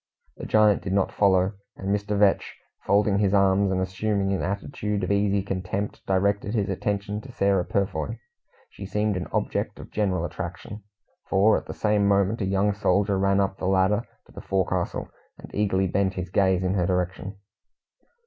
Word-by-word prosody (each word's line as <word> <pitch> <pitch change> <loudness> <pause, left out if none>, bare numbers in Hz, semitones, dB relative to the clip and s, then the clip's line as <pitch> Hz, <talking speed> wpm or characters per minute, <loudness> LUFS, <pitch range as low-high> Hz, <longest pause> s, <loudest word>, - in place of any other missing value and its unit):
The - - -7
giant 105 -2 +4
did 95 - -3
not 100 -1 +1
follow; 95 -1 +3 0.2
and 95 - -5
Mr. 105 0 -2
Vetch, 100 -1 +2 0.3
folding 100 0 +3
his 100 -1 +2
arms, 100 0 +3
and 95 - 0
assuming 95 +1 -1
an 95 - -1
attitude 100 +1 -3
of 90 - -1
easy 100 -1 +2
contempt, 95 +1 -4
directed 100 +3 +1
his 100 -2 0
attention 100 +1 -2
to 130 - -11
Sarah 100 -5 +2
Purfoy. 100 +3 -2 0.5
She 95 - -8
seemed 105 +1 0
an 90 -1 -3
object - - -2
of - - -11
general 95 -5 0
attraction, 90 +5 -7 0.5
for 100 +3 +4
at - - -3
the - - -6
same 105 -1 +2
moment 100 +3 +2
a - - 0
young 100 +2 +1
soldier 100 0 +1
ran 100 0 +2
up 95 -1 -1
the 90 - -2
ladder 95 +3 +3 0.2
to - - -20
the - - -9
forecastle, 95 -2 -1 0.3
and - - -13
eagerly 95 -2 +1
bent 95 +1 0
his 90 -1 -5
gaze 95 -2 +2
in 90 0 0
her 90 -3 +1
direction. 95 +2 -2
100 Hz, 175 wpm, -25 LUFS, 95-100 Hz, 0.5 s, giant